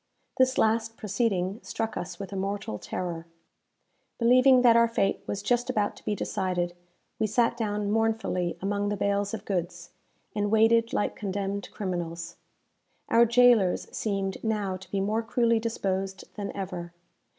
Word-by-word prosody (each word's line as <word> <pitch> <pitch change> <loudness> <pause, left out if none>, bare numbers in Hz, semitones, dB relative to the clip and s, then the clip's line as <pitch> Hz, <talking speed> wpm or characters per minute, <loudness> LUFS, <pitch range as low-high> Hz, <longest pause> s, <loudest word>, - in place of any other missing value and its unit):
This 260 0 +4
last 225 +1 +1
proceeding 200 -2 -1
struck 215 +4 -3
us 175 0 -5
with 200 +1 -7
a - - -4
mortal 195 - -3
terror. 170 -2 -5 0.9
Believing 255 +2 +5
that 235 -2 +7
our 235 0 +6
fate 200 -4 0
was 200 0 -3
just 245 +3 +1
about 205 -1 0
to - - -16
be 210 - -1
decided, 180 -4 -2 0.4
we 220 - +2
sat 230 +2 +2
down 210 -3 -1
mournfully 220 -5 0
among 205 +1 0
the 205 - -2
bales 200 +1 0
of 205 -1 -10
goods, 175 -2 -3 0.4
and 205 -1 0
waited 225 +1 +4
like - - -1
condemned 200 0 -3
criminals. 175 -4 -4 0.7
Our 235 +1 +5
jailers 235 -6 +4
seemed 195 -3 -2
now 210 -4 -1
to 185 -1 -11
be 195 - -1
more 215 +3 0
cruelly 230 0 +2
disposed 195 -4 -2
than 205 -2 -5
ever. 180 -3 -5
205 Hz, 150 wpm, -27 LUFS, 190-225 Hz, 0.9 s, that